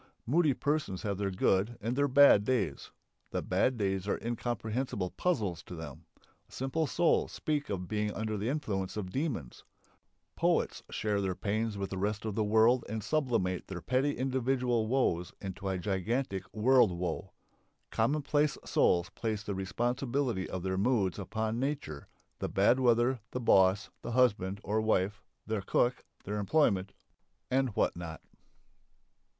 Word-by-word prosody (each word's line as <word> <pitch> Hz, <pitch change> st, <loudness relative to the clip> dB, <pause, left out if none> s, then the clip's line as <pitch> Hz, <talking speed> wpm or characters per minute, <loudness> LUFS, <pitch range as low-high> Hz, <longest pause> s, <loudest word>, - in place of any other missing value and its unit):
Moody 150 Hz, +1 st, +3 dB
persons 145 Hz, -12 st, -1 dB
have 100 Hz, -2 st, -2 dB
their 100 Hz, -1 st, 0 dB
good 95 Hz, +4 st, +1 dB
and 115 Hz, +3 st, -2 dB
their 145 Hz, +1 st, +2 dB
bad 140 Hz, -6 st, +7 dB
days. 105 Hz, -, -1 dB, 0.4 s
The -, -, -2 dB
bad 130 Hz, -1 st, +1 dB
days 95 Hz, -2 st, -1 dB
are -, -, +1 dB
incomprehensible 120 Hz, -4 st, -2 dB
puzzles 105 Hz, -, -1 dB
to 90 Hz, -, -8 dB
them. 80 Hz, -5 st, -9 dB, 0.4 s
Simple 140 Hz, +4 st, -1 dB
souls 170 Hz, +4 st, +2 dB
speak 150 Hz, -2 st, -2 dB
of 90 Hz, -3 st, -3 dB
being 105 Hz, +1 st, -1 dB
under 110 Hz, +1 st, -3 dB
the 105 Hz, +3 st, -2 dB
influence 105 Hz, -10 st, -2 dB
of 95 Hz, -3 st, -4 dB
demons; 125 Hz, -, -3 dB, 0.7 s
poets -, -, +1 dB
share 105 Hz, -2 st, -1 dB
their 95 Hz, -2 st, -1 dB
pains 110 Hz, +2 st, -1 dB
with 100 Hz, -1 st, -4 dB
the 95 Hz, -, -3 dB
rest 105 Hz, +2 st, -1 dB
of 110 Hz, -, -2 dB
the 110 Hz, -, 0 dB
world 110 Hz, +4 st, +4 dB
and 110 Hz, 0 st, -3 dB
"sublimate" 115 Hz, -, 0 dB
their 95 Hz, -2 st, -5 dB
petty 130 Hz, -, 0 dB
individual 125 Hz, -3 st, 0 dB
woes 95 Hz, -8 st, +1 dB
into 95 Hz, 0 st, -6 dB
a 95 Hz, -, -1 dB
gigantic 95 Hz, +3 st, -2 dB
world 120 Hz, 0 st, +4 dB
woe; 90 Hz, +1 st, -4 dB, 0.6 s
commonplace 145 Hz, +4 st, +1 dB
souls 85 Hz, 0 st, +2 dB
place 110 Hz, -2 st, -3 dB
the 100 Hz, -, -3 dB
responsibility 120 Hz, +3 st, -1 dB
for -, -, -4 dB
their 95 Hz, +1 st, -1 dB
moods 105 Hz, -4 st, +1 dB
upon 110 Hz, +3 st, -2 dB
"nature," 135 Hz, -, -3 dB, 0.3 s
the -, -, -2 dB
bad 105 Hz, +6 st, +3 dB
weather, 120 Hz, 0 st, +3 dB
the 125 Hz, -, -4 dB
boss, 95 Hz, -4 st, +4 dB
the 120 Hz, -, -5 dB
husband, 100 Hz, -6 st, +2 dB
or 110 Hz, +1 st, 0 dB
wife, 100 Hz, -2 st, +1 dB, 0.2 s
their 110 Hz, -2 st, -2 dB
cook, 120 Hz, +5 st, +1 dB, 0.2 s
their 105 Hz, +2 st, -3 dB
employment, 100 Hz, -5 st, +2 dB, 0.6 s
and 130 Hz, -4 st, +1 dB
what -, -, +1 dB
not. 85 Hz, -2 st, -7 dB
110 Hz, 150 wpm, -31 LUFS, 95-130 Hz, 0.7 s, bad